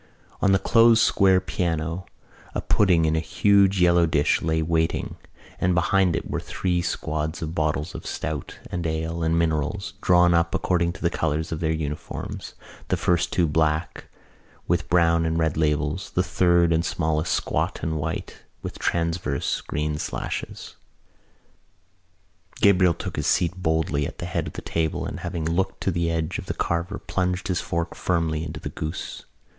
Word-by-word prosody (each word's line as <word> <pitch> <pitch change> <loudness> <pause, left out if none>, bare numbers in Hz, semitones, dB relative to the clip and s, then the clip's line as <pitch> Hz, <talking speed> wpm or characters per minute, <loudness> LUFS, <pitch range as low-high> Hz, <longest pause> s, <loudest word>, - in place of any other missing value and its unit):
On 100 - +4
the 95 - +5
closed 115 +2 +5
square 95 -3 +4
piano 85 -1 -2 0.5
a - - 0
pudding 90 -5 +3
in 80 0 +2
a - - +2
huge 100 +3 +3
yellow 85 -1 +5
dish 75 -2 +2
lay 80 0 0
in 80 -1 -1
waiting 80 -1 0 0.4
and 90 0 +2
behind 90 0 +3
it - - -3
were - - -2
three 90 -2 -1
squads 80 -1 -3
of 80 0 -4
bottles 75 +2 -1
of - - -7
stout 80 -3 -4
and 85 -2 -2
ale 80 +1 -2
and 80 +1 +1
minerals, 85 +3 -1
drawn 90 -1 +5
up 85 0 +2
according 85 -2 +1
to - - -11
the 85 - +2
colours 80 0 -1
of 80 - -3
their 80 -2 0
uniforms, 75 -2 -5 0.3
the - - 0
first 85 -1 +1
two 90 - +2
black, 80 +1 0 0.6
with 85 0 0
brown 85 -1 +4
and 80 0 0
red 80 -2 +1
labels, 75 +2 0
the 90 - +3
third 85 -2 +3
and 80 +1 +2
smallest 80 0 -1
squad - - 0
white, 80 0 -3 0.3
with - - -6
transverse 85 0 -1
green 75 0 -2
sashes. - - -5 1.8
Gabriel 90 -4 +5
took - - -6
his - - -1
seat 85 -1 +2
boldly 80 -3 +1
at - - -10
the - - -5
head - - -2
of - - -7
the - - -7
table 80 -1 -1
and, - - -5
having 85 -2 -4
looked 95 +4 -1
to 95 - +1
the 85 -1 0
edge 80 -1 -2
of - - -9
the - - -3
carver, 85 +4 -1
plunged 90 +1 -2
his 90 -2 0
fork 85 0 -2
firmly 80 -3 0
into 80 - -6
the - - -5
goose. 80 +3 -6
85 Hz, 170 wpm, -24 LUFS, 80-90 Hz, 1.8 s, the